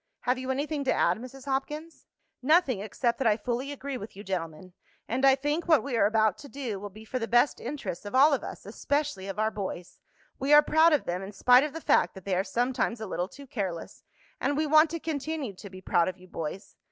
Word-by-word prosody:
Have 250 +1 0
you 260 0 -5
anything 285 +2 -1
to - - +2
add, 175 +5 +2
Mrs. 255 +2 -10
Hopkins?" 300 +4 -4 0.3
"Nothing 280 - +3
except 215 +4 -1
that 265 - +2
I 215 -1 +4
fully 245 +4 -3
agree 280 -1 -5
with 205 -1 -9
you 200 - -9
gentlemen. 180 -2 -5 0.3
And 255 +4 -2
I 270 -1 +7
think 295 +5 -2
what 315 -4 +5
we 275 -3 -3
are 210 -3 +4
about 220 -2 +2
to 285 - -11
do 250 -8 -4
will 205 +1 -7
be 215 +3 -13
for 255 +3 -3
the 230 - -3
best 240 +5 +3
interests 255 - -5
of 205 +4 -6
all 285 +3 +6
of 275 - 0
us, - - -8
especially 285 -10 -2
of 195 0 -5
our 220 +1 +1
boys. 190 -3 -6 0.4
We 275 +2 +2
are 295 0 +9
proud 315 +3 +5
of 300 - +2
them 180 +2 -2
in 195 +2 -8
spite 250 +6 +6
of 300 -1 -3
the 325 - -6
fact - - +2
that 190 - -11
they 195 - -1
are 185 - +1
sometimes 240 +1 -1
a 220 - -4
little 180 -2 -2
too 280 +7 -13
careless, 190 -10 -5 0.4
and 285 +2 0
we 310 - +1
want 310 +1 +5
to 335 +1 -4
continue 300 -6 -3
to 200 +2 -11
be 185 0 -11
proud 170 -2 +2
of 185 - -4
you, 185 0 -16
boys. 165 +3 -6
250 Hz, 240 wpm, -28 LUFS, 200-285 Hz, 0.4 s, are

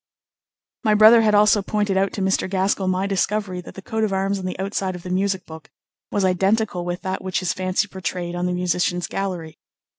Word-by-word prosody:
My 215 -2 +3
brother 220 +2 +8
had 215 -1 +3
also 210 0 +5
pointed 205 -1 -1
out 195 0 +1
to 195 - -2
Mr. 190 0 +1
Gaskell 190 0 0
my 185 +1 0
discovery 200 -1 -1
that - - -12
the 190 - -9
coat 220 0 -2
of 215 - 0
arms 195 +1 0
on 185 - -6
the 185 - -4
outside 190 -1 -2
of 175 - -9
the 180 - -6
music 190 0 0
book 160 -1 -11 0.4
was 200 -2 +1
identical 190 +1 +1
with 175 +2 -4
that 190 -1 -3
which 185 -1 -1
his 180 -2 0
fancy 185 +2 -1
portrayed 180 -2 -4
on 175 +1 -1
the - - -1
musicians' 180 -1 0
gallery. 180 -5 -4
190 Hz, 210 wpm, -22 LUFS, 180-200 Hz, 0.4 s, brother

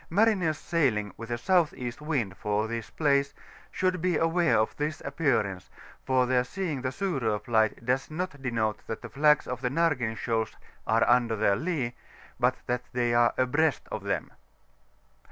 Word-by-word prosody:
Mariners 190 -5 +2
sailing 115 - 0
with 115 +1 -9
a 120 - 0
S.E. 150 -3 +1
wind 140 - -2
for 105 +2 -1
this 115 -1 -5
place, 140 -2 +1 0.4
shemd 185 -2 0
be 180 -2 +1
aware 165 -1 +2
of 110 +1 +1
this 150 +1 -2
appearance, 130 - -1 0.4
for 130 -1 +3
their 125 0 +3
seeii^ 150 +1 -3
the 130 - -1
Surop 130 - -1
Li^ht 110 0 +1
does 130 +2 0
not 160 -2 -4
denote 115 -4 -1
that 110 - -5
the - - -7
flags 150 +1 +3
of 125 0 -5
the 125 - 0
Nargen 135 -7 0
shoals 115 -2 -1 0.3
are - - +3
under 120 -2 +3
their 100 -2 +2
lee, 140 - -2 0.5
but - - +3
that 125 -1 -1
Sbey 120 -1 +1
are 120 0 +4
abreast 145 +4 +2
of - - -3
them. - - -2
130 Hz, 165 wpm, -28 LUFS, 115-155 Hz, 0.5 s, are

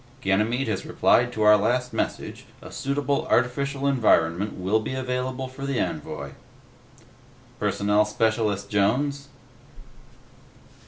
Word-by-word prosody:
"Ganymede 110 +6 +1
has 105 -4 -2
replied 120 0 +2
to 110 - -1
our 105 0 +7
last 125 +4 0
message; - - -4
a - - -12
suitable 140 +3 -1
artificial 140 +3 0
environment 105 -8 +2
will 95 +4 0
be 110 +4 -4
available 130 0 -3
for 130 +1 -10
the 140 -2 -1
envoy." - - -4 1.3
"Personnel 105 +1 +2
Specialist 105 -2 0
Jones?" 135 +8 0
120 Hz, 110 wpm, -25 LUFS, 105-135 Hz, 1.3 s, our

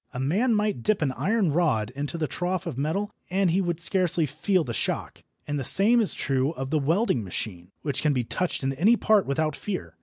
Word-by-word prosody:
A - - -3
man 205 - +1
might 210 - 0
dip 205 - +1
an 135 - 0
iron 195 - 0
rod 130 -10 +1
into 145 +5 -4
the 160 - -1
trough 180 +3 -3
of - - -4
metal 160 +10 -2 0.2
and 190 -1 +1
he 190 +3 +2
would 175 -3 -2
scarcely 170 -1 +2
feel 160 +6 0
the 120 -5 -5
shock. - - -3 0.2
And 145 0 -3
the - - -3
same 220 - +5
is 215 - 0
true 135 +2 0
of 135 -3 -6
the 155 - +2
welding 160 - +1
machine, 90 -1 -5
which 140 -2 -2
can 150 - +2
be 125 -3 0
touched 180 +6 -2
in 135 0 0
any 200 - +3
part 215 -3 +3
without 155 +2 -1
fear. 200 -3 -5
160 Hz, 220 wpm, -25 LUFS, 135-195 Hz, 0.2 s, same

